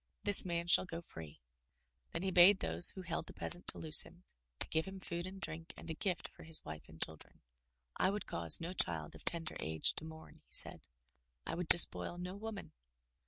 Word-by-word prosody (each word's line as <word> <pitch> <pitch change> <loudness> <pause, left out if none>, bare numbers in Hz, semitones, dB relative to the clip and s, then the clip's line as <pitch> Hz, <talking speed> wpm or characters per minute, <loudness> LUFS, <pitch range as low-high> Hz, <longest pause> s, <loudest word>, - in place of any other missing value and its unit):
This 205 -1 +9
man 170 -2 -4
shall 175 - +4
go 170 -2 -9
free." 80 - -14 0.7
Then 165 - -6
he 190 - -3
bade 185 +3 +5
those 80 +1 +1
who 190 - -8
held 170 -1 -7
the - - -14
peasant 175 +1 -4
to - - -6
loose 155 -1 +6
him, 175 - -8 0.3
to - - -2
give 160 0 -2
him 190 0 -11
food 175 -1 -7
and 190 +1 -11
drink 165 -2 -5
and 165 - -8
a - - -5
gift 180 +2 -5
for - - -20
his 160 0 +4
wife 75 0 -11
and 80 - -17
children. 80 -1 -7 0.6
"I 185 - 0
would 205 +2 -6
cause 85 -2 +4
no 170 +2 -8
child 80 - -4
of - - -14
tender 165 -2 -4
age 80 0 0
to - - -8
mourn," 160 0 -14
he - - -41
said. - - +5 0.3
" - - -49
I - - -6
would 175 0 -6
despoil 165 - +4
no 180 +1 -8
woman. 210 0 -10
165 Hz, 215 wpm, -33 LUFS, -, 0.7 s, This